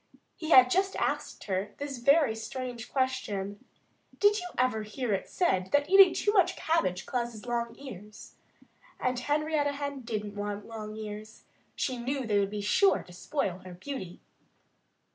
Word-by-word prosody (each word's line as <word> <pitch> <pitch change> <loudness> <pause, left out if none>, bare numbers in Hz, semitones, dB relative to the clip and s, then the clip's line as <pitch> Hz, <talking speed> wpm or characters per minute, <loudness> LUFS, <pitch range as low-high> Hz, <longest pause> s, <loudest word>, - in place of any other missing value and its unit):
He 315 - -6
had 255 -5 +8
just 385 +4 +2
asked - - -2
her 195 +1 -3
this 275 -4 -6 0.4
strange 250 -3 -6
question: 210 -7 -2 0.6
"Did 410 +1 +5
you 360 - -5
ever 250 -3 +2
hear 215 +2 -3
it 190 - -2
said 190 - +1
that 285 +4 +2
eating 390 -2 +9
too 415 - +1
much 380 -3 +4
cabbage 190 - 0
causes 240 -3 -3
long 235 -1 -2
ears?" 210 -6 -10 0.7
And 255 -1 0
Henrietta 295 +1 0
Hen 280 -1 -4
didn't 215 -3 -4
want 205 0 -4
long 215 -2 -7
ears. 215 0 -8 0.3
She 255 -2 -1
knew 260 +2 -2
they 210 -2 +2
would 200 -1 +1
be 210 0 -4
sure 390 - +3
to 180 - -15
spoil 185 -2 -2
her 185 -1 -10
beauty. 185 -4 -7
240 Hz, 155 wpm, -29 LUFS, 205-285 Hz, 0.7 s, eating